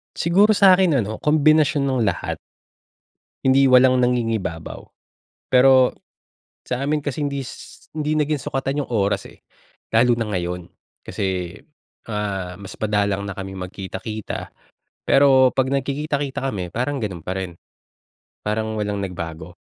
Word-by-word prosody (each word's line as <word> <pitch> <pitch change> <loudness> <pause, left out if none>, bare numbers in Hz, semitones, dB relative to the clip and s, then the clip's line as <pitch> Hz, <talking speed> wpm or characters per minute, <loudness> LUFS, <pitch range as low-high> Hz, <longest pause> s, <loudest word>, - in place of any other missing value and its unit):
Siguro 195 +6 +4
sa'kin 190 -3 +5
ano, 110 0 -2
kombinasyon 155 -1 +4
ng 130 -2 0
lahat. 100 -5 -1 1.1
Hindi, 135 +1 +4
walang 130 0 +6
nangingibabaw. 115 -9 -1 0.7
Pero 130 0 +6 0.7
sa 125 - -3
amin 150 +1 0
kasi 145 +1 -2
hindi 140 -1 -2
s - - -11 0.2
hindi 155 0 -1
naging 150 -1 0
sukatan 135 +2 -2
'yung - - -18
oras, 100 -2 +1
eh. - - -18 0.5
Lalo 120 +2 +4
na 115 -2 -2
ngayon, 90 -1 -3 0.4
kasi, 95 -1 -3 0.5
ah, 100 -4 -3
mas 100 - -9
madalang 100 -2 0
na - - -3
kami 95 -1 -6
magkita-kita, 95 +3 -6 0.6
pero 135 -2 +6
pag 130 -1 +2
nagkikita-kita 140 0 -2
kami 90 -4 -4
parang 130 +5 -1
ganu'n 95 -6 -4
pa 90 - -3
rin, 90 -3 -5 0.9
parang 110 +1 -1
walang 105 -1 -2
nagbago. 85 -2 -6
120 Hz, 130 wpm, -22 LUFS, 100-140 Hz, 1.1 s, walang